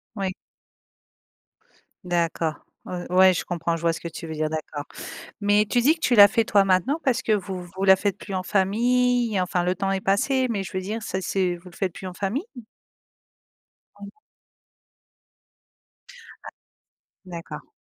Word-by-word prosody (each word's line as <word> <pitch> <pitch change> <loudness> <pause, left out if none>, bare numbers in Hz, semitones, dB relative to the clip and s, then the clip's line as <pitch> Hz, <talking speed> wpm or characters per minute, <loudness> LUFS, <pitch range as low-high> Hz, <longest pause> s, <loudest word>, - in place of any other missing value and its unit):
Oui. 195 -2 -2 1.7
D'accord, 170 -2 0 0.3
ou - - -8 0.3
ouais 185 0 +7
je - - -2
comprends, 170 -1 -2
je - - -8
vois 170 -1 +2
ce - - -5
que - - -8
tu 165 - -8
veux 160 - -5
dire, 155 0 -1
d'accord, 155 -2 -5 0.6
mais 205 +1 +3
tu 245 +4 +1
dis 290 +7 +4
que 320 - -21
tu 250 - +2
la 205 -2 +10
fais 230 +1 +1
toi 200 -2 +3
maintenant, 195 - +2
parce 260 -2 +2
que 220 - -1
vous 190 -3 -1
vous 185 +2 -7
la 190 0 +8
faites 200 -1 -2
plus 200 - -8
en 185 -1 -1
famille, 235 +3 +2
enfin 180 -1 0
le 180 +1 0
temps 195 +1 -1
est 195 - -1
passé, 255 +8 +1
mais 200 -4 -1
je - - -9
veux 185 - -2
dire 215 +4 -4
ça 190 - -3
c'est 185 -1 0
vous 175 +1 -13
le 170 - -17
faites 185 -3 -2
plus 190 - -8
en 180 - -7
famille? 205 - -2 1.6
Oui. 200 - -8 2.4
Ah. - - -7 0.8
D'accord. 170 -2 -8
190 Hz, 175 wpm, -24 LUFS, 175-215 Hz, 2.4 s, la